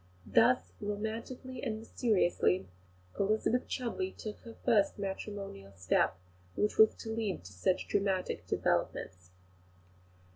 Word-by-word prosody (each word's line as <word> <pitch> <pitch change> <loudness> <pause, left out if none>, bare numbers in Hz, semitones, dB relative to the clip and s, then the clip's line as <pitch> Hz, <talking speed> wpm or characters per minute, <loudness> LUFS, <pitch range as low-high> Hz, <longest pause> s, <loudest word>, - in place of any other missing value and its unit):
Thus, 90 +1 +4
romantically 225 +5 -4
and 225 -5 -2
mysteriously, 185 - +1 0.5
Elizabeth 215 +4 +2
Chudleigh 280 +10 -3
took 215 -1 -6
her 230 -1 -11
first 215 -5 +4
matrimonial 195 - -5
step, 90 -2 +2 0.4
which 210 - 0
was 220 0 +7
to 225 - -6
lead 215 - -2
to 95 +2 -11
such 135 - 0
dramatic 195 -2 0
developments. 90 -1 -1
210 Hz, 110 wpm, -32 LUFS, 180-225 Hz, 0.5 s, was